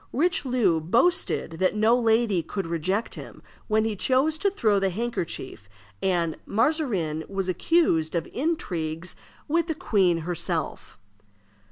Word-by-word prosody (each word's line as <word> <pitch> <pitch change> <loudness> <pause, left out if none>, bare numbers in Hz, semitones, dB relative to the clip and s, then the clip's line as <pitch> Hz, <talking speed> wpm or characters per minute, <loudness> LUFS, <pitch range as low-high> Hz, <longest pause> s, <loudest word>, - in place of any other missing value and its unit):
Richelieu 255 - +2
boasted 180 - +1
that 185 +2 +2
no 220 +3 +4
lady 225 -5 +2
could 195 +4 -4
reject 170 +6 -1
him - - -9 0.2
when 215 0 +2
he 220 -1 -1
chose 270 +9 +1
to 400 - +2
throw 215 - +2
the 195 0 +1
handkerchief, 175 - -4 0.3
and 170 -4 0
Mazarin 205 - 0
was 195 -1 -2
accused 180 - +2
of 165 - 0
intrigues 180 - -3 0.3
with 335 +2 +1
the 320 - -2
queen 185 - +2
herself. 170 - -3
200 Hz, 130 wpm, -25 LUFS, 170-250 Hz, 0.3 s, no